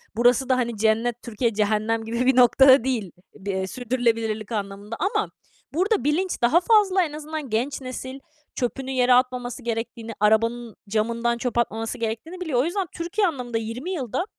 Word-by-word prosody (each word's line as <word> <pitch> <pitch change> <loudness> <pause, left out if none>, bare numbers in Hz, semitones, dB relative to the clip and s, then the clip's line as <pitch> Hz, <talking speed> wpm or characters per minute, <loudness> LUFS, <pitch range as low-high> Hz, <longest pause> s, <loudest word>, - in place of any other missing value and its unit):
Burası 245 +3 +3
da, 255 - +3
hani, 235 -3 -1
cennet, 225 +2 +1
Türkiye, 235 0 -1
cehennem 215 +2 0
gibi 235 +2 -1
bir 260 0 +4
noktada 260 +1 +7
değil 230 -9 -2 0.2
bir, 200 -1 -5
eee, 190 0 -2
sürdürülebilirlik 230 -2 -1
anlamında 205 +1 -4
ama 390 - 0 0.4
burada 390 +6 +1
bilinç 335 +6 0
daha 245 +9 +5
fazla 390 -2 +4
en 305 -3 -4
azından 305 -2 -6
genç 255 +6 -1
nesil 260 +1 -6 0.4
çöpünü 265 +1 -3
yere 250 -1 +3
atmaması 250 0 0
gerektiğini, 230 0 -4
arabanın 230 +2 +1
camından 235 +2 0
çöp 240 -1 -3
atmaması 225 0 -1
gerektiğini 235 +11 -4
biliyor. 300 -9 0
O 260 - +2
yüzden 365 +2 -2
Türkiye 350 +4 0
anlamında 250 -7 -3
20 230 +10 -4
yılda, 310 - -2
245 Hz, 165 wpm, -24 LUFS, 225-275 Hz, 0.4 s, noktada